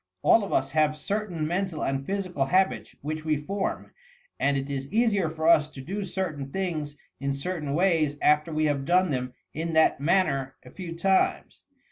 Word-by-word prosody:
All 225 - +5
of 200 - -5
us 135 - +1
have 155 -1 +2
certain 190 -2 -2
mental 175 0 -2
and 135 0 -1
physical 185 -5 -2
habits 190 +6 +1
which 155 +1 -3
we 155 -1 +1
form, 195 +7 -3 0.5
and 140 0 +2
it 135 0 -3
is 135 -1 -4
easier 210 -6 +2
for 160 0 -2
us 155 -3 +5
to 140 - -12
do 195 +10 -4
certain 155 -7 -3
things 155 -6 -3 0.2
in 140 0 -1
certain 150 -1 -3
ways 160 -5 +2
after 150 +2 +3
we 155 0 +1
have 145 -2 0
done 180 +3 +3
them 125 -1 -3 0.2
in 165 +2 -3
that 160 -3 +4
manner 145 -5 +1
a 125 - -12
few 175 -3 -7
times. 190 +3 +1
155 Hz, 180 wpm, -27 LUFS, 140-185 Hz, 0.5 s, All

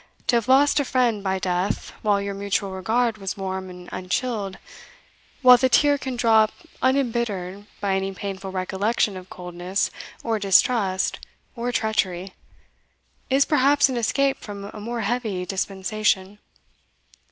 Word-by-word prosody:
To 245 - +2
have 235 0 +1
lost 280 +3 +5
a - - +2
friend 245 -6 +1
by 190 -1 0
death 180 +1 -1
while 205 -2 +2
your 200 0 -3
mutual 200 0 -1
regard 220 +4 0
was 195 0 -4
warm 190 -1 -4
and 180 0 -11
unchilled, 195 +1 -2 0.9
while 250 -1 +9
the 260 +2 +2
tear 285 +3 +4
can 260 -2 -4
drop 220 -2 +4 0.3
unembittered 230 -7 -1
by 200 -2 0
any 195 0 -1
painful 195 0 -6
recollection 195 +3 0
of 185 0 -9
coldness 180 +2 -3 0.3
or 225 -2 0
distrust 195 0 +2 0.4
or 240 +1 -2
treachery, 195 -5 -1 1.0
is 275 +1 +4
perhaps 285 -1 +4
an 260 - -2
escape 270 +4 +1
from 200 -1 -8
a - - -8
more 235 +2 -4
heavy 215 -4 -2
dispensation. 195 +1 -1
205 Hz, 140 wpm, -24 LUFS, 190-240 Hz, 1.0 s, while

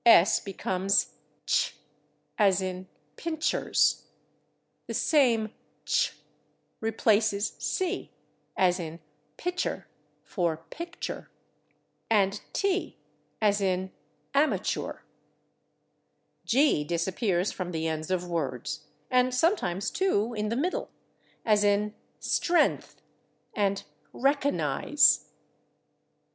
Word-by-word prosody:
S/ 220 -4 +7
becomes 195 0 0 0.3
/tsh/, - - +2 0.6
as 195 -3 +4
in 185 0 -4 0.3
/pincers/. 315 -2 +1 0.8
The - - -4
same 235 -8 +3 0.3
/tsh/ - - +1 0.6
replaces 220 -1 +2
/c/, 375 -1 -2 0.5
as 180 -1 +3
in 165 -1 -6 0.4
/pitcher/ 360 +1 -2 0.4
for 165 -4 -2
/picture/, 340 +1 -6 0.8
and 200 -2 +2
/t/, 395 -1 0 0.5
as 205 -1 +3
in 185 -1 0 0.4
/amachoor/. 285 +2 0 1.5
/G/ 265 - +4
disappears 180 +2 0
from 185 -2 -4
the 160 -1 -2
ends 160 0 -3
of 180 -1 -1
words, 140 -8 -3 0.2
and 250 0 +3
sometimes, 215 - +1
too, 240 - +1
in 210 -1 -2
the 230 - -1
middle, 335 +9 -1 0.6
as 210 -2 +4
in 205 +1 +2 0.3
/stren'th/ 345 0 +1 0.6
and 200 -1 0 0.3
/reco'nize 275 - +3
205 Hz, 90 wpm, -28 LUFS, 180-260 Hz, 1.5 s, S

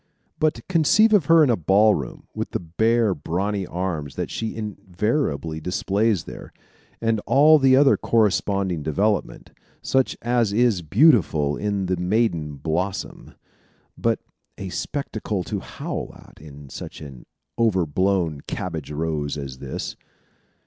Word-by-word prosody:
But 155 -1 0
conceive 185 +6 +4
of 195 -8 +4
her 165 +1 +6
in 135 - +3
a - - +3
ball 100 +5 +4
room, 65 -9 -5
with - - -4
the - - 0
bare, 110 +5 +1
brawny 95 +5 -2
arms 85 -5 -4
that - - -4
she 110 -1 -4
invariably 100 - -2
displays 100 +2 0
there, - - -10 0.5
and 115 -1 +1
all 155 +3 +6
the 135 -1 +5
other 135 0 +5
corresponding 100 -5 +1
development, 100 +8 -1 0.3
such 130 -1 +1
as 120 -3 +1
is 115 -4 +2
beautiful 80 - +3
in 100 0 -2
the 95 0 -1
maiden 90 -5 0
blossom, 85 +7 -4 0.6
but - - 0 0.4
a 95 - -6
spectacle 110 -5 -3
to - - -4
howl - - -6
at - - -17
in 70 -2 -12
such - - -8
an 70 -5 -11 0.3
over 100 -7 +2
blown 85 -2 0
cabbage 80 -6 -4
rose 75 -1 -2
as 70 -3 -7
this. 70 -2 -5
95 Hz, 135 wpm, -23 LUFS, 80-115 Hz, 0.6 s, her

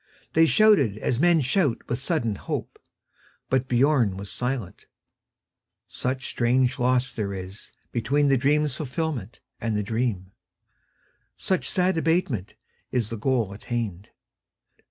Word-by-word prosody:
They 160 0 +5
shouted 155 - +4
as 120 +2 -1
men 170 0 +4
shout 140 0 0
with 120 - -2
sudden 135 -6 0
hope; 100 - -5 0.7
But 130 0 +2
Biörn 125 -5 +3
was 100 +1 -7
silent, 125 -6 -4 1.0
such 130 0 -3
strange 125 +2 +1
loss 125 +1 +2
there 105 -3 -2
isBetween 110 +8 -2
the 135 - +5
dream's 145 +2 +2
fulfilment 135 - -4 0.2
and 110 -2 -1
the 105 - 0
dream, 105 -4 -2 1.1
Such 185 - 0
sad 180 -2 +2
abatement 160 - 0 0.4
in 125 -2 +1
the - - -2
goal 115 -3 0
attained. 105 -3 -4
125 Hz, 120 wpm, -25 LUFS, 110-145 Hz, 1.1 s, They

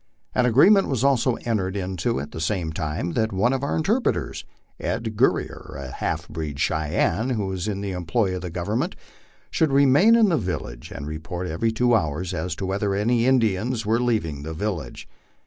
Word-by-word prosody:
An 125 -1 +3
agreement 195 - +6
was 130 -3 -1
also 130 -3 +3
entered 100 -5 -1
into 90 -7 -1
at 75 +2 -6
the 80 - -6
same 85 -2 -1
time 80 +2 -2
that 110 0 0
one 105 +7 +2
of 135 - -1
our 140 - -1
interpreters, 215 +10 0 0.4
Ed. 115 -1 -3
Gur - - +4
rier, - - -7
a 70 -2 -7
half - - -3
breed 75 -3 -5
Cheyenne 80 - 0
who 110 -6 -1
was 95 0 -3
in 100 -2 -2
the 100 -1 -3
employ 90 +3 0
of 90 - -4
the 90 - -5
Government, 105 - -2 0.6
should 160 -4 +2
remain 140 - +6
in 225 -3 +5
the 165 - +2
village 90 - -4
and 70 - -7
report 80 +4 -5
every 100 +8 0
two 120 +2 +2
hours 85 -2 0
as 85 0 -3
to 95 - -4
whether 100 +1 -1
any 115 +4 +2
Indians 115 -2 +1
were 110 +2 +2
leaving 110 -12 0
the 80 +2 -6
village. 85 - -4
100 Hz, 190 wpm, -24 LUFS, 85-120 Hz, 0.6 s, agreement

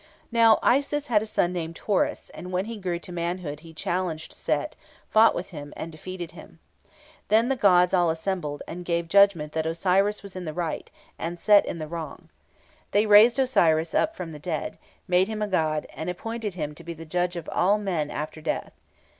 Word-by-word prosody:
Now, 230 -1 +6
Isis 285 +3 +2
had 210 -3 +4
a 220 - -5
son 180 -4 0
named 165 -2 -4
Horus, 205 -3 -1
and 180 - -8
when 185 +1 0
he 225 -1 -6
grew 180 -3 -2
to 175 - -9
manhood 170 -3 -3
he 165 +1 -13
challenged 165 0 -3
Set, - - -2 0.4
fought 220 +1 +6
with 185 +3 -5
him, 145 -3 -8
and 165 - -5
defeated 175 +2 -7
him. - - -14 0.7
Then 225 +3 +3
the 270 - +2
gods 180 -6 +4
all 175 -2 +4
assembled, 160 -3 -3
and 180 +1 -6
gave 170 -1 -1
judgment 175 -5 +4
that 160 0 -1
Osiris 190 +5 +1
was 200 -2 -9
in 185 -1 -5
the 155 -1 -5
right, 170 -3 -3 0.3
and 170 +1 -4
Set 205 +1 +5
in - - -3
the 155 -1 -5
wrong. 160 -2 -7 0.6
They 205 +2 +3
raised 215 +4 +7
Osiris 165 -12 +3
up 325 +1 +1
from 170 - -6
the 150 - -9
dead, 155 0 -4 0.3
made 180 +1 +3
him 215 -1 -3
a - - -1
god, 155 -5 0
and 160 +3 -5
appointed 220 +2 -4
him 150 -4 -4
to 170 - -13
be 170 0 -6
judge 175 +3 -2
of 170 -2 -6
all 195 +4 +3
men 175 -8 -2
after 155 +1 -5
death. - - -3
180 Hz, 195 wpm, -26 LUFS, 160-205 Hz, 0.7 s, raised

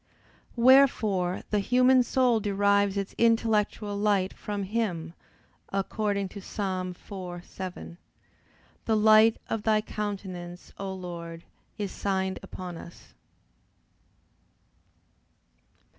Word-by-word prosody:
Wherefore 230 -8 +4
the 210 - +2
human 255 +4 +4
soul 245 -1 +2
derives 200 -1 +2
its 195 0 -3
intellectual 220 -2 +2
light 200 -2 +1
from 205 -1 -4
Him, 185 -6 -2 0.6
according 200 0 -1
to 200 - -9
Ps. 195 - -12
4:7, 185 -2 -5 0.9
"The 220 -1 +2
light 215 +1 +6
of 225 - -2
Thy 215 0 +3
countenance, 190 -5 -6
O 195 -1 -4
Lord, 170 -3 -7 0.3
is 205 -2 -3
signed 190 -1 -2
upon 180 -2 -7
us." 170 - -13
200 Hz, 95 wpm, -27 LUFS, 185-215 Hz, 0.9 s, light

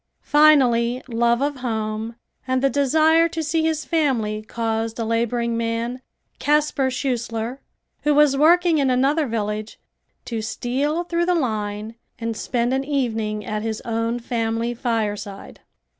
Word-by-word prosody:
Finally, 255 -5 +4
love 235 0 +1
of 290 -1 -1
home 220 -2 -3 0.3
and 260 0 0
the 275 - +3
desire 315 +4 +4
to 325 -1 -3
see 320 +2 0
his 315 -1 0
family 245 -10 0
caused 225 0 -3
a 230 - -2
laboring 235 +1 0
man, 230 +2 -2 0.4
Casper 295 -2 +2
Schushler, 245 -2 -3 0.4
who 295 -1 +2
was 295 -2 +5
working 335 +2 +4
in 275 -2 +2
another 275 +4 +2
village, 215 -1 -3 0.5
to 230 -2 -3
steal 270 +9 -1
through 345 0 -1
the 360 - +3
line 215 -6 -2 0.2
and 230 -1 -3
spend 240 +2 -1
an 265 0 0
evening 225 -7 -2
at 210 +1 -3
his 220 0 -3
own 230 +1 -1
family 230 0 -2
fireside. 210 -4 -3
240 Hz, 140 wpm, -22 LUFS, 225-285 Hz, 0.5 s, was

